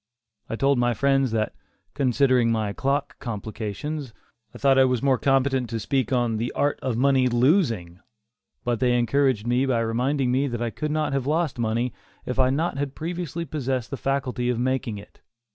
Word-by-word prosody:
I - - -2
told 135 +1 +2
my 120 -1 +2
friends 135 0 +2
that, 110 -1 -1 0.4
considering 130 -3 +3
my 110 -3 -1
clock 140 +3 -1
complications, 115 +5 -5 0.4
I - - -11
thought 135 -1 +4
I - - +7
was 125 -1 0
more 135 -2 +3
competent 135 -2 +2
to 115 - -3
speak 130 +3 -1
on 120 -3 +1
"The 115 +3 -2
Art 145 0 0
of 125 -4 -1
Money 130 0 +3
Losing"; 120 - +1 0.6
but 120 -2 -1
they 125 -1 +3
encouraged 120 -1 +1
me 125 +3 +1
by 120 -3 +1
reminding 125 +4 0
me 135 +3 +1
that 120 -3 -3
I 120 -1 -2
could 150 - -3
not 150 -2 0
have 135 -1 -1
lost 155 -4 0
money, 115 +1 0 0.3
if 125 +1 -3
I 130 - +6
had 130 +1 +1
not 145 -3 -2
previously 170 0 -4
possessed 130 -5 -3
the - - -2
faculty 130 -3 -1
of 125 - 0
making 125 -3 -1
it. 100 - -14
130 Hz, 185 wpm, -24 LUFS, 120-140 Hz, 0.6 s, I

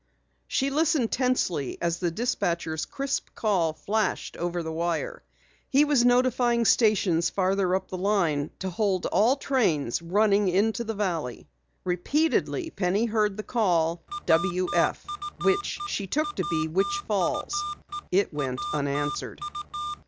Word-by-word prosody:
She 275 +1 0
listened 300 -5 +2
tensely 245 - 0
as 170 0 -1
the 175 - 0
dispatcher's 170 - -1
crisp 275 - -3
call 185 -8 +1
flashed 215 +6 -1
over 175 0 -2
the 160 - -4
wire. 165 0 -2 0.5
He 280 +2 +5
was 285 -5 +3
notifying 245 -1 +3
stations 195 -7 +3
farther 190 -1 +1
up 190 0 -3
the 185 - -5
line 175 -7 +1
to 190 -1 -4
hold 190 -1 0
all 235 +6 +3
trains 180 - 0
running 200 +3 +3
into 210 +5 +1
the 225 -1 -4
valley. 170 - -3 0.4
Repeatedly 300 - 0
Penny 195 +2 +1
heard 215 -3 +1
the 215 - -4
call 175 -8 +1 0.2
"W 175 +2 +2
F" 170 - +1 0.4
which 400 0 +1
she 200 - -3
took 300 +7 -1
to 185 -3 -2
be 155 -2 0
Witch 400 - 0
Falls. - - 0 0.6
It 190 -2 +2
went 135 -3 -2
unanswered. 150 +1 -2
195 Hz, 135 wpm, -26 LUFS, 170-235 Hz, 0.6 s, He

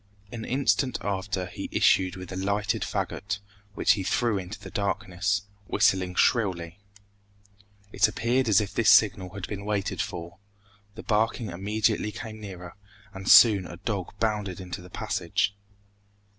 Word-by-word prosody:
An 115 -2 -6
instant 130 -1 +1
after 95 -2 -2
he 90 - -7
issued 95 -1 +3
with 90 -1 -9
a - - -5
lighted 100 +2 -1
fagot, 100 0 -3 0.4
which - - +3
he 100 0 +2
threw 105 +2 +1
into 95 +3 -7
the - - -10
darkness, 100 -1 -1 0.2
whistling 95 -3 +2
shrilly. 90 -6 +1 1.1
It - - +4
appeared 120 +3 0
as 105 - +6
if 100 -2 -3
this 115 - +3
signal 100 -3 +4
had 100 - -4
been 100 -1 -6
waited 105 0 -1
for; 85 -3 -6 0.6
the 115 - -9
barking 110 -1 0
immediately 105 +4 0
came 110 0 -8
nearer, 90 -4 -9 0.4
and 95 0 -5
soon 100 -6 +8
a 85 - -9
dog 100 -1 -4
bounded 105 -4 -1
into 90 0 -7
the 90 - -13
passage. 100 -2 -1
100 Hz, 145 wpm, -27 LUFS, 95-110 Hz, 1.1 s, soon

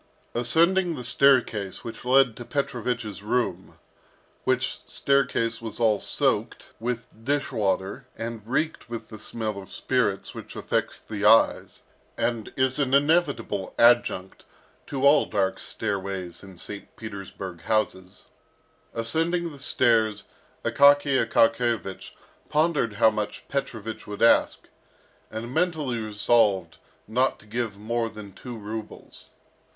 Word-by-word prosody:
Ascending 170 +9 +2
the 125 - -6
staircase 120 -7 +2
which 115 - -8
led 130 -2 +4
to 120 - -8
Petrovich's 120 - -3
room 120 +4 -2 0.7
which - - 0
staircase 115 -5 +1
was 115 0 -7
all 110 -3 +3
soaked - - -1
with 120 0 -2 0.2
dish 145 +3 0
water 100 +4 -1
and 115 -1 -5
reeked 155 +2 -1
with 115 -1 -6
the 110 - -9
smell 110 -2 -3
of 95 - -14
spirits - - -1
which - - -9
affects - - -2
the 105 -2 -6
eyes, 110 +2 +4 0.3
and 115 -2 -1
is 130 +1 +1
an 135 -1 +2
inevitable 145 - +1
adjunct 115 -6 +3 0.4
to 135 -1 -1
all 145 +2 +6
dark 95 -2 0
stairways 95 -4 -4
in 95 -2 -13
St. 100 +3 -8
Petersburg 95 -4 -8
houses 95 -2 -1 0.7
ascending 165 +9 0
the 145 - -12
stairs, 115 -5 +2 0.4
Akaky 140 -2 +5
Akakiyevich 115 -3 +1 0.4
pondered 150 -7 +2
how 110 +2 +4
much 105 -1 -4
Petrovich 115 -6 -4
would 105 +1 -3
ask, 115 - +4 0.6
and 115 +3 -6
mentally 155 -7 0
resolved 105 -4 +2 0.3
not 125 +5 +2
to - - -19
give 110 -2 -3
more 115 +2 -1
than 105 -3 -10
two 125 -2 -8
rubles. 110 +1 -8
115 Hz, 125 wpm, -26 LUFS, 105-130 Hz, 0.7 s, all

